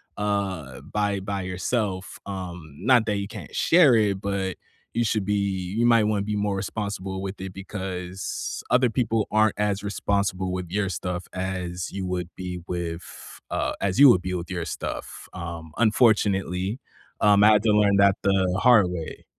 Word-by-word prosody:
uh 95 -11 -2
by 100 +5 -1
by 100 0 -3
yourself, 95 +1 -2
um, 90 -6 -7
not 120 -4 +3
that 105 - +1
you 100 0 -3
can't - - -10
share 165 -8 +5
it, 100 -3 +2
but 100 -2 -2 0.4
you 120 +1 +1
should 105 -2 0
be 105 - 0
you 100 +3 0
might 115 -2 +5
wanna 105 -1 +1
be 105 +1 -2
more 100 -1 0
responsible 95 -1 -4
with 95 0 -6
it 95 -1 -5
because 95 -1 -5
other 125 -1 +3
people 115 -2 0
aren't 110 -1 +3
as 105 -1 0
responsible 100 -2 -1
with 90 -2 -4
your 100 +1 0
stuff 90 -1 -4
as 90 -1 -4
you 95 -1 -4
would 90 -1 -3
be 90 -1 -5
with 85 -1 -6
uh, - - -1
as 100 +5 0
you 145 - +10
would 105 -9 +6
be 90 0 -3
with 85 +1 -5
your 85 -2 -3
stuff, 75 - -6
um, 85 -2 -7
unfortunately, 105 -2 +2 0.4
um, 105 -1 +5
I 105 - +8
had 105 +1 +3
to 110 - +3
learn 105 -1 +4
that 100 -1 +5
the 95 -1 +2
hard 120 -3 +6
way. 85 -3 -6
95 Hz, 175 wpm, -25 LUFS, 90-105 Hz, 0.4 s, you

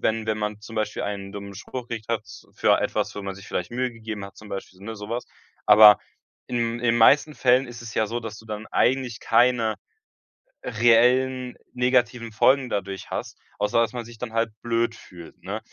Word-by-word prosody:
wenn 110 0 0
wenn 110 -1 -1
man 105 0 -3
zum 110 +1 -11
Beispiel 110 -1 -2
einen 100 -1 -5
dummen 100 -1 -8
Spruch 120 +5 -7
gekriegt 115 -2 -6
hat, 110 -2 -1 0.3
für - - +3
etwas, - - -1
wo 105 - -5
man 100 -1 -5
sich 95 - -12
vielleicht 90 - -3
Mühe 125 0 -2
gegeben 110 -3 -7
hat, 100 - -12
zum 110 - -12
Beispiel, 95 -1 -7
ne, 110 +2 -7
sowas. 115 +4 -5 0.4
Aber 105 -1 +9 0.5
in 120 -1 -1
in - - -10
den 120 -1 +3
meisten 145 +6 +5
Fällen 130 +1 +3
ist 120 -1 -10
es 115 -2 -8
ja 110 - +1
so, 120 +3 -3
dass 110 -1 -7
du 110 - -15
dann 105 0 -6
eigentlich 125 -3 +1
keine 115 -1 +3 0.9
reellen 125 +2 +3 0.2
negativen 125 -2 +1
Folgen 130 +4 +3
dadurch 100 -2 -4
hast, - - -5 0.2
außer 105 +2 +1
dass 115 - 0
man 120 -2 -5
sich 115 -1 -13
dann 125 -2 -5
halt 115 0 0
blöd 115 0 0
fühlt, 85 -7 -14
ne? 100 +5 -4
115 Hz, 200 wpm, -24 LUFS, 105-120 Hz, 0.9 s, Aber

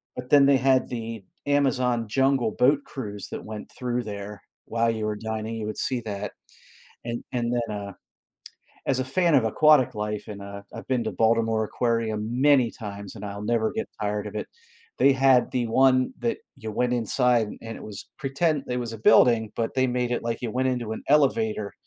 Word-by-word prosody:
but 125 0 -7
then 145 -1 +7
they 140 0 +5
had 130 0 +3
the 115 -4 -6 0.2
Amazon 130 -5 +1
jungle 135 0 +2
boat 135 +3 +4
cruise 105 -6 -6
that - - -5
went 110 -1 -8
through 125 -1 -2
there 105 -1 -7 0.2
while 115 0 +1
you 110 -1 -1
were 105 -1 -2
dining, 110 +1 -4
you 110 - -4
would 105 0 -5
see 130 -2 -1
that, 100 -1 -4 0.7
and 120 0 -4
and 120 -1 -1
then, 115 -3 -1
uh, 100 -1 -6 0.9
as 130 -1 +1
a 130 - -1
fan 170 +4 +2
of 130 - +4
aquatic 130 +2 +4
life, 105 0 -3
and 100 -1 -7
uh, 100 0 -8
I've - - -9
been 125 -3 +1
to - - -2
Baltimore 115 -1 +2
Aquarium 115 -2 -1
many 135 -5 +5
times, 100 -2 -8
and 105 -1 -7
I'll 100 0 -6
never 110 0 +1
get - - -3
tired 105 0 -1
of - - -9
it, - - -3 0.5
they 140 - +5
had 130 -1 +4
the 120 -2 0
one 130 +2 +3
that 120 -1 -1 0.2
you 110 -1 -6
went 125 +3 0
inside, 120 0 +2
and 115 0 -7
it - - -10
was 105 -1 -8
pretend 140 +1 0
it 125 - -1
was 120 -2 -4
a - - -6
building, 110 0 +5
but 115 +2 -2
they 130 0 +3
made 125 0 -1
it 120 - -1
like 115 -1 -3
you 120 -3 -3
went 130 +2 +1
into 120 -3 -2
an - - -8
elevator 110 -8 +2
115 Hz, 200 wpm, -25 LUFS, 110-130 Hz, 0.9 s, then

